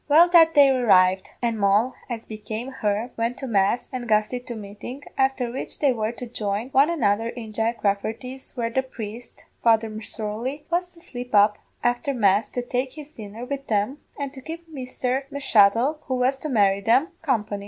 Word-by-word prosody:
"Well, 325 +4 +7
the 335 -2 +7
day 285 -3 +6
arrived, 190 -8 +4
and 230 -2 0
Moll, 205 +5 +3 0.2
as 230 -2 -5
became 220 +3 -6
her, 220 -1 -1
went 230 +2 -1
to 270 - -5
mass, 205 -1 +1
and 245 -2 -4
Gusty 215 +3 +2
to 245 -1 -7
meeting, 215 +6 -8
afther 265 -2 +1
which 255 - -5
they 280 -3 +3
were 220 -1 -1
to 245 - -7
join 215 0 -3
one 275 +3 +4
another 225 -9 +1
in 225 -3 -8
Jack 225 +2 -1
Rafferty's, 225 +7 -3
where 230 -1 -1
the 265 - +2
priest, 235 -2 -9 0.2
Father 225 -1 +3
M'Sorley, 220 +5 -5
was 355 +1 0
to 335 - -17
slip 245 -8 -6
up 205 +1 +5 0.2
afther 245 +3 0
mass 205 -2 +3
to 245 - -3
take 255 +1 -2
his 300 -1 -10
dinner 220 0 -8
wid 275 +1 -5
them, 215 +7 0 0.2
and 280 -1 -4
to 265 - -10
keep 330 +4 -8
Misther 265 -2 -3
M'Shuttle, 265 0 +3
who 260 - -1
was 255 +2 +2
to 305 - -5
marry 200 -5 +3
them, 245 - +3
company. 215 -9 -1
240 Hz, 185 wpm, -24 LUFS, 215-270 Hz, 0.2 s, Well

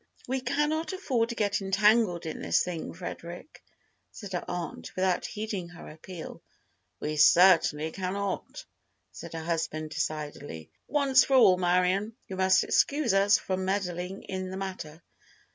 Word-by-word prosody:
"We 260 +1 -1
cannot 305 +5 -1
afford 255 -12 0
to 235 - -4
get 205 -2 0
entangled 195 -1 +3
in 160 - -5
this - - +2
thing, 175 -3 -5
Frederic," 175 - -9 0.5
said 205 -3 -9
her 175 - -2
aunt, 175 -1 -6
without 185 -1 0
heeding 210 -5 -5
her 175 -1 -12
appeal. 160 +2 -9 0.6
"We 155 0 -3
certainly 160 -1 +5
cannot," 195 - -4 0.5
said - - -10
her 165 -1 -5
husband, 160 -2 -2
decidedly. 150 - -5 0.2
"Once 275 -2 +4
for 270 - +2
all, 195 -8 +7
Marion, 185 +4 +1
you 190 - -6
must 190 0 +4
excuse 280 -6 +2
us 200 +1 +5
from 190 0 -3
meddling 185 -1 -3
in 185 -1 -5
the 190 - -6
matter." 170 -5 -6
185 Hz, 145 wpm, -28 LUFS, 170-210 Hz, 0.6 s, all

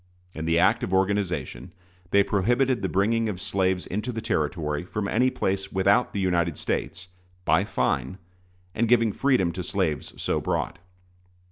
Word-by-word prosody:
In 80 - -5
the 80 +1 +2
act - - +4
of 95 - -1
organization 90 -8 -1 0.4
they 100 +2 +5
prohibited 120 +6 +1
the 95 - -1
bringing 110 +3 +1
of 95 -4 -4
slaves 95 -1 0
into 105 +6 -3
the 115 - -4
Territory 80 -8 -1
from 100 +3 -3
any 125 +5 +2
place 95 -5 -2
without 100 +5 +3
the 100 - -3
United 85 -4 +1
States, 90 +3 -3 0.4
by - - +3
fine, 65 +10 -1 0.6
and 115 - +1
giving 115 -2 +4
freedom 125 -11 +2
to 90 +3 -5
slaves 75 -3 -2
so - - -1
brought. - - -2
95 Hz, 155 wpm, -25 LUFS, 85-110 Hz, 0.6 s, they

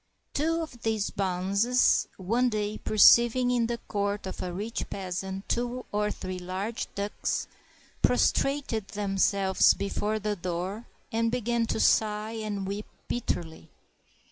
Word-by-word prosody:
] - - -48
Two 325 +3 +1
of 245 -7 -10
these 220 -3 0
bonzes, 200 +6 +2
one 230 +7 +1
day 210 -1 -2
perceiving 240 +3 +6
in 240 -2 +2
the 235 0 -2
court 200 -1 -1
of 190 - -5
a 180 - -3
rich 210 +6 -4
peasant 190 +1 -4
two 245 +1 -2
or 210 0 +1
three 185 -2 -5
large 190 +5 -4
ducks, 200 +1 -2 0.6
prostrated 275 -7 +2
them 200 -1 -3
selves 190 -1 +4
before 205 +2 -1
the 210 0 -2
door 185 +4 -4 0.2
and 230 0 +1
began 235 -1 0
to - - -1
sigh 215 0 +2
and 215 -3 -3
weep 200 +2 -4 0.2
bit 240 - -3
terly. 160 -1 -3
210 Hz, 140 wpm, -28 LUFS, 195-235 Hz, 0.6 s, perceiving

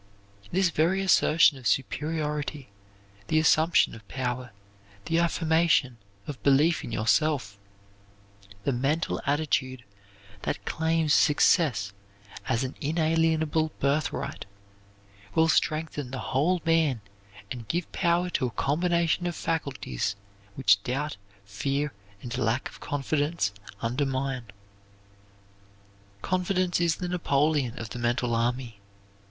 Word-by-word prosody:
This 185 -1 +2
very 170 +5 +2
assertion 160 -6 +4
of 125 - -3
superiority, 150 +3 -2 0.6
the 155 - +1
assumption 160 +1 +4
of 110 -3 -12
power, 125 -1 -3 0.6
the 165 0 +1
affirmation 160 -7 +2 0.3
of 145 -3 -7
belief 150 +4 +3
in - - -6
yourself, 115 -2 +1 1.0
the - - +1
mental 140 +7 0
attitude 135 -4 0 0.6
that - - -3
claims 160 -1 +1
success 130 - +3 0.5
as 115 - +1
an 130 - -4
inalienable 160 0 +1
birthright, 140 -4 -1 0.9
will 160 0 +4
strengthen 155 -4 0
the 130 - -5 0.2
whole 165 +6 +2
man 160 -8 +2 0.5
and 120 -3 -6
give 175 +5 -2
power 175 0 +1
to 130 - 0
a 120 - -10
combination 170 +3 +1
of 175 - -3
faculties 130 - -2 0.4
which 105 -6 +4
doubt, 140 +5 -3 0.3
fear, 140 +9 -2 0.3
and 120 - -5
a 125 - -2
lack 115 +4 0
of - - -15
confidence 145 - -1 0.3
undermine. 130 +1 -1 1.8
Confidence 185 -1 0
is 170 -2 +2
the 180 - -4
Napoleon 150 -6 +1
of 110 - -6
the 120 - -5
mental 120 0 0
army. 120 -1 -1
145 Hz, 115 wpm, -27 LUFS, 125-165 Hz, 1.8 s, assertion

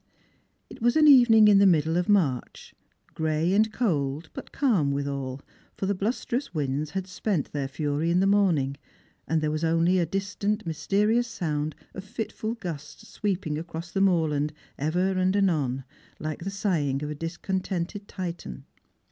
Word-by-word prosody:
It - - -13
was 240 +1 +3
an 310 -1 +6
evening 240 -6 +8
in 205 -1 +6
the 200 - +6
middle 160 -2 +3
of 175 0 +1
Mai'ch, 160 - 0 0.2
— - - -37
gray 160 +2 0
and 215 +2 +3
cold, 155 - -1
but - - -9
calm 200 - +2
witiial, 140 -1 -3 0.4
for - - -2
the 200 - +1
blusterous 240 +5 -2
winds 145 0 -1
had 190 +4 -3
spent 185 -3 -2
their 140 -2 -2
fury 145 +3 -1
in 175 +1 +3
the 190 - +3
morning, 175 -9 +2 0.5
and 160 0 +1
there 155 -1 0
was 155 +1 -2
only 165 +3 +3
a 170 - +1
distant 200 +3 -2
mysterious 205 +9 0
Bound 150 -2 -1 0.2
of 190 - -7
fitful 220 +2 -4
gusts 175 0 -8
sweeping 180 -7 -2
across 165 +1 -7
the 195 - 0
moorland 155 -6 +2 0.2
ever 175 +6 0
and 185 0 +1
anon, 150 -10 +1 0.3
like 155 -1 -4
the 195 - -3
sighing 160 -9 -1
of 150 - -3
a - - -2
discontented 180 +4 -4
Titan. 170 - -6
175 Hz, 165 wpm, -26 LUFS, 150-200 Hz, 0.5 s, evening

